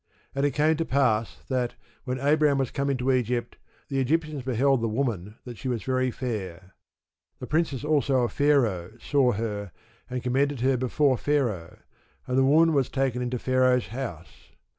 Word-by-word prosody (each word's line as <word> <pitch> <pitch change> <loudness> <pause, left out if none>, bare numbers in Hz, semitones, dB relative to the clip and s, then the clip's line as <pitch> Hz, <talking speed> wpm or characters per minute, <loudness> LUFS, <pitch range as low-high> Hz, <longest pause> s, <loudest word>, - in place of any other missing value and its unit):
And 140 +1 +1
it 140 - -4
came 155 +2 +3
to 165 - 0
pass, 125 -7 0
that, 125 -2 -1 0.3
when 125 0 -2
Abram 145 +1 +3
was 135 -3 -1
come 140 -1 -1
into 130 -1 +1
Egypt 120 -1 -1 0.3
the 135 -1 -1
Egyptians 150 +2 0
beheld 130 +1 +2
the 115 - 0
woman 110 -5 -2
that 120 -3 -9
she - - -5
was 120 -3 -2
very 130 0 0
fair. 95 -8 -5 0.6
The - - -7
princes 150 -4 -1
also 140 -4 +2
of 120 - -1
Pharaoh 115 -10 +1
saw 130 0 +2
her, 105 -2 -4 0.4
and 125 -1 -4
commended 135 +1 0
her 130 +1 +3
before 130 +1 +1
Pharaoh: 120 - -1 0.5
and 125 - -2
the 135 - +4
woman 160 +4 +5
was 140 -3 +1
taken 130 -2 -1
into 125 0 -2
Pharaoh's 130 0 +2
house. 105 -9 -7
130 Hz, 170 wpm, -26 LUFS, 120-140 Hz, 0.6 s, woman